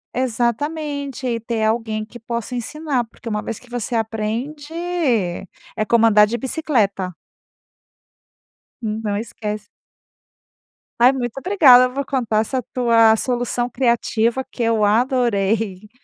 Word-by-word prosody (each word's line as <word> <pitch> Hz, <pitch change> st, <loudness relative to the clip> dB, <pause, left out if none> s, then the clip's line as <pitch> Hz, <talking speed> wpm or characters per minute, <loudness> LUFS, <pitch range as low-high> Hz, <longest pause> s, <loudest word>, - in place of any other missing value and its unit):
Exatamente. 275 Hz, +3 st, -2 dB
E 235 Hz, -2 st, -1 dB
ter 230 Hz, -1 st, -2 dB
alguém 220 Hz, -1 st, -1 dB
que 235 Hz, +2 st, -12 dB
possa 235 Hz, +1 st, -5 dB
ensinar, 270 Hz, +2 st, -2 dB
porque 230 Hz, +1 st, -15 dB
uma 210 Hz, -2 st, -1 dB
vez 225 Hz, -, -5 dB
que 250 Hz, -, -19 dB
você 245 Hz, 0 st, -3 dB
aprende, 230 Hz, +7 st, -3 dB, 1.0 s
é 215 Hz, -, -1 dB
como 230 Hz, -1 st, +5 dB
andar 210 Hz, -2 st, +6 dB
de 235 Hz, +3 st, -2 dB
bicicleta. 220 Hz, -, -1 dB, 1.7 s
Hum, 220 Hz, -1 st, -3 dB
não 205 Hz, -2 st, -1 dB
esquece 210 Hz, -1 st, -5 dB, 1.3 s
Ai, 245 Hz, +2 st, +7 dB
muito 245 Hz, -1 st, -4 dB
obrigada. 270 Hz, -8 st, +6 dB
Eu 250 Hz, -, -4 dB
vou 280 Hz, +1 st, -2 dB
contar 240 Hz, -6 st, 0 dB
essa 255 Hz, +3 st, -2 dB
tua 230 Hz, -3 st, +5 dB
solução 245 Hz, +1 st, -1 dB
criativa 235 Hz, 0 st, +1 dB
que 245 Hz, -, -7 dB
eu 225 Hz, -2 st, +2 dB
adorei. 215 Hz, -4 st, +1 dB
235 Hz, 125 wpm, -20 LUFS, 220-255 Hz, 1.7 s, Ai